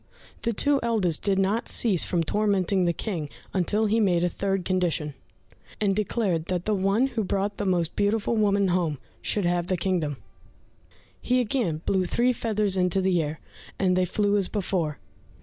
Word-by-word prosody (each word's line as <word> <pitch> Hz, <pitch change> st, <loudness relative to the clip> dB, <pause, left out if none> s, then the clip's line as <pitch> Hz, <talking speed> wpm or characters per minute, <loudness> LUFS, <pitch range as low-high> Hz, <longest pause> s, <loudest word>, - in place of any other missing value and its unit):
The 235 Hz, -, 0 dB
two 280 Hz, +6 st, +2 dB
eldest 210 Hz, -9 st, 0 dB
did 195 Hz, -2 st, +1 dB
not 200 Hz, +5 st, 0 dB
cease 200 Hz, -8 st, +3 dB
from 170 Hz, -2 st, 0 dB
tormenting 195 Hz, -1 st, +1 dB
the 170 Hz, -, +3 dB
King 170 Hz, -4 st, -4 dB, 0.2 s
until 205 Hz, +4 st, +1 dB
he 220 Hz, +2 st, +2 dB
made 180 Hz, -5 st, +2 dB
a 180 Hz, -, +2 dB
third 195 Hz, -1 st, -2 dB
condition, 175 Hz, -5 st, 0 dB, 0.7 s
and 200 Hz, -2 st, +1 dB
declared 195 Hz, -5 st, 0 dB
that 180 Hz, -1 st, -2 dB
the 215 Hz, -, +1 dB
one 195 Hz, +5 st, +2 dB
who 235 Hz, -4 st, -2 dB
brought 200 Hz, +1 st, -1 dB
the 205 Hz, -, -2 dB
most 175 Hz, -3 st, 0 dB
beautiful 210 Hz, +3 st, +1 dB
woman 200 Hz, -2 st, +2 dB
home, 175 Hz, -5 st, 0 dB, 0.2 s
should 205 Hz, -3 st, 0 dB
have 175 Hz, 0 st, 0 dB
the 185 Hz, -, 0 dB
kingdom. 165 Hz, -6 st, -1 dB, 1.0 s
He 250 Hz, +1 st, +1 dB
again 210 Hz, -, -1 dB
blew 190 Hz, -, +2 dB
the 180 Hz, -, -1 dB
three 250 Hz, +6 st, +2 dB
feathers 215 Hz, -4 st, 0 dB
into 180 Hz, +1 st, +2 dB
the 185 Hz, -2 st, +2 dB
air, 150 Hz, 0 st, -4 dB, 0.4 s
and 185 Hz, -2 st, +2 dB
they 185 Hz, 0 st, +2 dB
flew 205 Hz, +3 st, +1 dB
as 195 Hz, -3 st, +2 dB
before. 180 Hz, -7 st, -2 dB
195 Hz, 180 wpm, -26 LUFS, 175-210 Hz, 1.0 s, cease